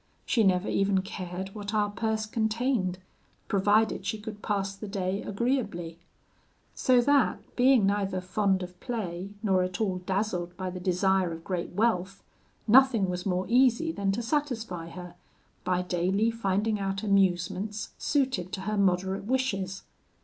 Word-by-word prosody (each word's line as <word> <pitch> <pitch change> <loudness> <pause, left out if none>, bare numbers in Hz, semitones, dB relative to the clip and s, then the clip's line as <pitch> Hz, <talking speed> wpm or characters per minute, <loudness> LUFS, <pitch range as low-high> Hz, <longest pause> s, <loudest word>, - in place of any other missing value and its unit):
She 230 - +2
never 185 0 +2
even 195 -1 +1
cared 190 -1 -6
what 210 0 -5
our 205 -1 +1
purse 220 +1 -1
contained, 220 -3 0 0.5
provided 205 +1 +2
she 200 +3 -2
could 210 -1 -8
pass 195 -2 -1
the 210 +2 -8
day 195 -1 -2
agreeably; 205 -7 -2 0.7
so 250 -1 +4
that, 285 +1 +1
being 250 -4 +5
neither 195 -1 0
fond 190 +1 0
of 180 0 -10
play 200 -5 -4
nor 190 -3 +3
at 180 0 -2
all 190 -4 0
dazzled 180 -2 -2
by 185 -1 -3
the 180 - -6
desire 185 0 +1
of 165 0 -7
great 180 -1 -3
wealth, 195 -2 0 0.4
nothing 230 -5 +5
was 180 +2 -4
more 185 0 0
easy 255 +5 +3
than 200 -9 -1
to 235 - -2
satisfy 230 - -2
her, 180 0 -9 0.5
by 180 0 0
daily 185 +5 +1
finding 210 -1 0
out 195 0 -2
amusements 195 +1 +1
suited 260 - 0
to 190 - -3
her 210 +2 -2
moderate 190 0 +1
wishes. 195 -7 -1
195 Hz, 150 wpm, -28 LUFS, 185-220 Hz, 0.7 s, being